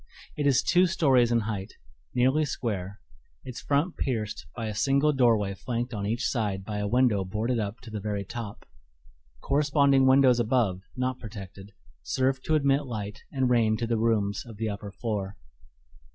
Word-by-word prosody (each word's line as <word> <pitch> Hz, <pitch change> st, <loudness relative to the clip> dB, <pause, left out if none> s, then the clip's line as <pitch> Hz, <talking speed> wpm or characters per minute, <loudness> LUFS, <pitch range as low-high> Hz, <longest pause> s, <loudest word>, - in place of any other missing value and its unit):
It 145 Hz, -1 st, 0 dB
is 135 Hz, -3 st, +3 dB
two 180 Hz, +1 st, +4 dB
stories 135 Hz, -9 st, +3 dB
in 115 Hz, -1 st, +3 dB
height, 105 Hz, -3 st, -4 dB, 0.4 s
nearly 130 Hz, +5 st, +3 dB
square, 100 Hz, -9 st, -3 dB, 0.4 s
its 125 Hz, -, -7 dB
front 145 Hz, +5 st, 0 dB
pierced 110 Hz, -5 st, -3 dB
by 115 Hz, -, -4 dB
a 110 Hz, -, -3 dB
single 140 Hz, +7 st, +2 dB
doorway 115 Hz, -7 st, +3 dB
flanked 120 Hz, +4 st, -4 dB
on 100 Hz, -2 st, -3 dB
each 115 Hz, +4 st, -1 dB
side 100 Hz, -6 st, -2 dB
by 105 Hz, 0 st, -4 dB
a 105 Hz, -, -1 dB
window 120 Hz, -3 st, +2 dB
boarded 110 Hz, +6 st, -1 dB
up 105 Hz, +1 st, -4 dB
to 120 Hz, -, -11 dB
the 105 Hz, -, -4 dB
very 100 Hz, -1 st, -3 dB
top. 110 Hz, 0 st, -7 dB, 0.8 s
Corresponding 140 Hz, -2 st, +3 dB
windows 130 Hz, -2 st, +5 dB
above, 115 Hz, -6 st, +1 dB
not 130 Hz, 0 st, -2 dB
protected, 100 Hz, -2 st, -10 dB, 0.3 s
serve 130 Hz, -, 0 dB
to 155 Hz, -, +2 dB
admit 140 Hz, -1 st, +2 dB
light 105 Hz, -3 st, -5 dB
and 130 Hz, -2 st, +1 dB
rain 110 Hz, -3 st, +3 dB
to 115 Hz, -, -2 dB
the 115 Hz, -1 st, 0 dB
rooms 105 Hz, -3 st, +1 dB
of 115 Hz, -4 st, -12 dB
the 110 Hz, 0 st, -2 dB
upper 100 Hz, 0 st, -6 dB
floor. 100 Hz, -2 st, -4 dB
115 Hz, 170 wpm, -27 LUFS, 105-130 Hz, 0.8 s, windows